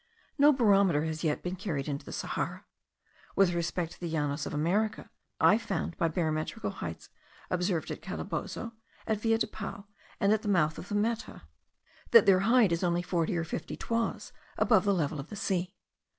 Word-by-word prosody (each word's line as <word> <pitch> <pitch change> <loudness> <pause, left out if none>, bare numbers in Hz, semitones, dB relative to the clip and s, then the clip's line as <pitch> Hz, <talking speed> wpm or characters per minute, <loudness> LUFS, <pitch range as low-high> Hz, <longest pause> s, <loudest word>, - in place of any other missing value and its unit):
No 290 +1 +8
barometer 200 - +4
has 160 0 -4
yet 150 -2 0
been 180 +1 -3
carried 170 -8 -3
into 140 -1 -3
the - - -9
Sahara. - - -3 0.7
With 190 -3 +4
respect 170 0 -2
to - - -13
the 175 - -4
Llanos 145 -3 -1
of - - -6
America, 195 +9 0 0.3
I 215 - +5
found 180 -6 -3
by 165 - +1
barometric 160 +5 -2
heights - - -7 0.4
observed 180 -2 0
at - - -6
Calabozo, 230 -1 -5 0.3
at 220 -1 0
the 225 - 0
Villa 225 - +4
del 220 - -1
Pao, 200 -1 -6 0.3
and 200 +1 +4
at 215 - +1
the - - -6
mouth 160 -6 +2
of 180 - -9
the 205 - -2
Meta, 225 - -1 0.7
that - - +8
their 195 -2 +6
height 225 0 +4
is 170 +2 0
only 175 0 +1
forty 175 -1 0
or 165 - 0
fifty 165 - -5
toises 230 0 -2 0.2
above 215 -5 +4
the 200 - +3
level 150 -3 -1
of 140 - -7
the - - -7
sea. 185 -2 -2
180 Hz, 190 wpm, -30 LUFS, 165-210 Hz, 0.7 s, No